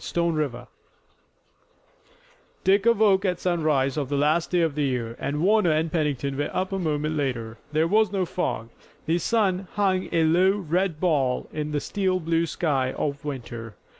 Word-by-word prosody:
STONE 170 -1 0
RIVER 150 -5 -2 2.0
Dick 195 +3 +3
awoke 210 -4 +4
at 180 -3 0
sunrise 155 -7 +1
of 140 -3 -2
the 145 - -1
last 155 +4 +2
day 180 -1 +2
of 165 -3 +1
the 150 - -2
year, 120 -3 -2
and 150 +3 -2
Warner 210 -1 +4
and 155 +1 +1
Pennington 145 -4 -1
were 145 - -1
up 185 +1 -2
a 195 - -1
moment 155 -2 -1
later. 120 -6 -3
There 155 +2 +2
was 215 +1 +3
no 195 -2 0
fog. 140 -10 -3 0.4
The 165 +3 +1
sun 195 -3 +1
hung 190 -2 +1
a 165 - +2
low, 180 +5 +3
red 180 -2 -1
ball 140 -8 +1
in 150 0 -3
the 150 - 0
steel 185 +2 -1
blue 165 0 0
sky 135 -5 0
of 140 -1 -3
winter. 120 -6 -6
160 Hz, 170 wpm, -25 LUFS, 145-185 Hz, 2.0 s, awoke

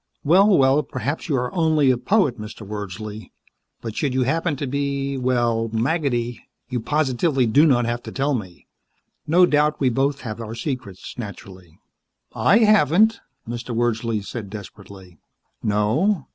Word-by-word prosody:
"Well, 185 +7 +5
well, 135 +2 +4
perhaps 140 +3 -4
you 145 - +1
are 125 -1 -2
only 155 -5 +3
a - - +2
poet, 135 - +1
Mr. 105 0 -8
Wordsley. 105 +1 -7 0.5
But 115 -2 -6
should 135 -4 -1
you 130 - +2
happen 160 +4 0
to 140 - -4
be 140 0 -2
a - - -3
little 120 -3 +1
well, - - -8
maggoty, 120 -1 -1 0.3
you 125 -1 -2
positively 135 +1 +1
do 140 +8 +4
not 120 -4 +3
have 120 +1 -2
to - - -9
tell 140 +2 0
me. 95 -8 -6 0.6
No 175 +4 +5
doubt 150 -2 +2
we 130 - +3
both 135 +3 0
have 115 -2 -6
our 115 0 -6
secrets. 125 - -6
Naturally." 95 -6 -10 0.6
"I 210 - +4
haven't," 210 +2 +4 0.3
Mr. 120 0 -5
Wordsley 115 -2 0
said 110 -3 -6
desperately. 95 -4 -11 0.4
"No? 130 - +1
125 Hz, 160 wpm, -22 LUFS, 110-145 Hz, 0.6 s, Well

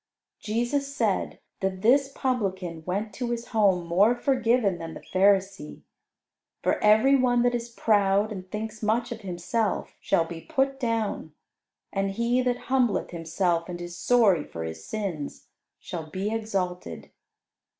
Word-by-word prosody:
Jesus 260 +6 -1
said - - 0 0.2
that 190 0 -2
this 270 +4 +4
Publican 190 -11 -2
went 200 +3 -2
to 245 +2 -3
his 235 0 -4
home 195 -6 +3
more 195 +8 +4
forgiven 240 - +1
than 165 -1 -7
the - - -7
Pharisee, 195 -3 +2 0.8
for - - +1
every 220 +6 +6
one 245 -2 +3
that 245 0 +2
is 240 0 -3
proud 205 -2 +2
and 185 -3 -7
thinks 220 +1 -5
much 230 +3 0
of 225 -1 -6
himself 195 +3 -2
shall 165 - +2
be 165 0 -8
put 270 - 0
down, 225 - -2 0.6
and 195 0 0
he 235 +5 +1
that 250 -1 -1
humbleth 250 -5 +2
himself 170 +1 -1
and 175 -1 -5
is 175 0 -7
sorry 205 -8 +3
for 85 - -7
his 80 0 -6
sins, 185 -9 -5 0.3
shall 160 -2 -6
be 195 +6 -2
exalted. 185 - -3
210 Hz, 145 wpm, -26 LUFS, 180-240 Hz, 0.8 s, every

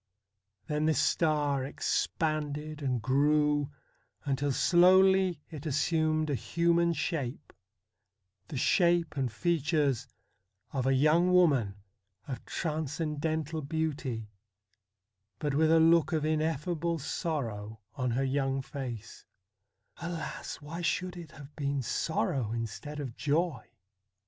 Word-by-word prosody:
Then 150 +1 0
this 160 - +2
star 150 -4 +1
ex 135 - 0
panded 155 -1 -2
and 125 -5 -1
grew, 145 +1 +2 0.6
until 140 0 0
slowly 185 +1 +4
it 155 0 -6
assumed 155 +1 +1
a - - +1
human 170 +4 +2
shape 145 -4 -3 0.9
the 145 - -5
shape 170 +4 +2
and 130 -4 -1
features 145 -5 0 0.7
of 130 -2 0
a 135 - +3
young 155 +6 +4
woman 140 - +4 0.5
of 130 -3 -5
transcendental 155 0 -2
beauty, 140 -7 -3 1.1
but 145 +2 -2
with 155 +2 +3
a 165 0 +6
look 165 0 +4
of 155 -1 +1
ineffable 160 +2 0
sorrow 115 - -3
on 130 -4 -1
her 125 +3 0
young 135 0 0
face, 125 -6 -7 0.7
Alas! 170 -1 -5
why 160 +4 -7
should 180 +2 -1
it 170 -3 -9
have 145 0 -13
been 140 -2 -1
sorrow 120 -3 -1
instead 115 +6 -5
of 130 -5 -5
joy 150 -4 -1
150 Hz, 115 wpm, -30 LUFS, 135-165 Hz, 1.1 s, a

